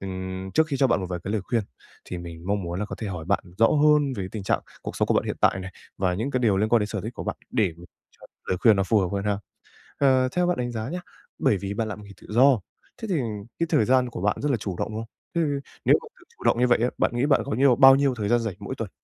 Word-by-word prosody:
Ừm, 95 0 -5
trước 160 0 +4
khi 145 -3 -2
cho 135 - +4
bạn 120 -6 +1
một 95 - -3
vài 90 - -2
cái 100 - -3
lời 110 - 0
khuyên 115 0 0 0.4
thì 90 - -6
mình 85 0 -9
mong 100 -1 0
muốn 85 +1 -4
là 105 - -1
có - - -7
thể 110 - -4
hỏi 90 -4 -5
bạn 100 +4 0
rõ 115 - +6
hơn 150 -1 +4
về 95 -2 -3
tình 105 -3 -5
trạng - - +1 0.2
cuộc - - -6
sống - - +1
của - - +3
bạn - - +2
hiện - - -3
tại 95 - +3
này, 95 0 -8 0.3
và 95 -2 +1
những 115 +9 -2
cái 130 -2 0
điều 105 -5 +3
liên 105 +2 +1
quan 120 0 +4
đến 105 - 0
sở 105 -1 -4
thích 110 +6 -6
của - - -6
bạn - - -3
để 105 -8 +1 0.4
cho - - -17 0.2
lời 90 - +1
khuyên 110 -4 +6
nó 95 - +2
phù 105 +3 +2
hợp 95 - +1
hơn 100 0 -2
ha. 100 -1 0 0.6
Ờ, 130 -2 +4
theo 180 0 +1
bạn 180 - +1
đánh 120 -1 -2
giá 110 0 -4
nhá, 180 +5 -4 0.4
bởi 105 - +3
vì 100 +1 -4
bạn 110 +1 -2
làm 105 0 -6
nghề 100 - -13
tự - - -14
do, 125 +2 +5 0.4
thế 225 - -4
thì 185 - +1 0.4
cái 170 - +1
thời 110 - +4
gian 130 +1 +3
của 100 - -6
bạn 105 0 +1
rất 145 - 0
là 130 - +2
chủ 95 -4 -5
động, - - -1
đúng 110 - -5
không? 115 - -7 0.3
Thế 170 - +1
thì 140 -2 -2
nếu - - +6
mà 465 - -11
tự - - -19
chủ - - -12
động - - +3
như 125 - +4
vậy 120 - +4
á, 125 - +2
bạn - - +2
nghĩ 125 +4 +2
bạn 145 - +4
có 140 - -5
nhiều 125 +2 +4
bao 135 0 +8
nhiêu 140 -2 +2
thời 105 -4 -3
gian 120 +1 +3
rảnh 110 -5 -3
mỗi - - -5
tuần? - - -5
110 Hz, 310 wpm, -25 LUFS, 95-130 Hz, 0.6 s, bao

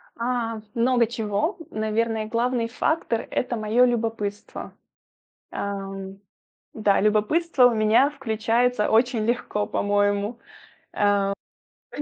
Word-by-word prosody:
А, 230 -2 -2 0.2
много 240 0 +3
чего. 225 - -2
Наверное, 220 0 -1
главный 235 +1 0
фактор- 235 -1 -1
это 250 -1 -1
моё 220 +3 +3
любопытство. 225 -4 -3 0.8
Ам, 195 -1 -5 0.5
да, 210 -3 +2
любопытство 250 +8 +3
у 245 - +3
меня 220 +6 +4
включается 235 -3 0
очень 230 0 +2
легко, 235 -3 -1
по-моему. 205 +2 0 1.5
Э, - - -5
225 Hz, 95 wpm, -24 LUFS, 210-245 Hz, 1.5 s, меня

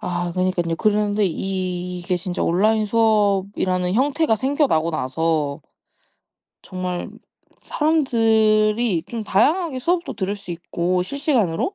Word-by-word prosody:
아 175 0 -3
그니깐요. 180 -2 -1
그런데 210 +1 +1
이게 180 -1 -3
진짜 175 0 -4
온라인 215 +5 +2
수업이라는 200 -4 +1
형태가 280 0 +2
생겨나고 260 - +1
나서 150 0 -1 1.0
정말 180 -1 -4 0.5
사람들이 225 - +2
좀 230 -2 -4
다양하게 305 - +1
수업도 340 +6 -1
들을 200 -1 -2
수 195 -3 -11
있고 175 +1 -1
실시간으로 275 - -1
200 Hz, 270 characters per minute, -21 LUFS, 180-230 Hz, 1.0 s, 온라인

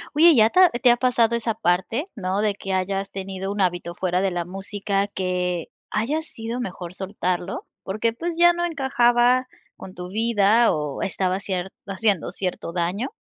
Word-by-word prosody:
Oye, 325 +1 +7
¿ya 220 -2 +6
te 365 - +2
ha 365 - +8
te 240 -1 +4
ha 240 - +3
pasado 240 -2 +2
esa 230 -1 -1
parte, 215 - 0
no, 195 -1 -1
de 210 -1 +1
que 195 -1 -4
hayas 195 +1 -1
tenido 195 0 -5
un 205 0 -2
hábito 175 -2 -1
fuera 180 0 0
de 195 -1 +1
la 175 -1 -2
música 195 +2 -2
que 180 -3 -2 0.2
haya 260 +9 0
sido 230 -6 -6
mejor 180 -6 -6
soltarlo 185 -2 -3 0.2
porque 215 +4 -1
pues 335 +7 -4
ya 345 0 +6
no 345 0 -1
encajaba 255 -5 +3 0.3
con 185 - -10
tu 180 0 -7
vida 225 +1 +3
o 150 -2 -3
estaba 185 -1 -1
cier 190 -2 -3 0.2
haciendo 195 -3 0
cierto 180 -3 -4
daño? 180 +8 -1
200 Hz, 175 wpm, -23 LUFS, 185-235 Hz, 0.3 s, ha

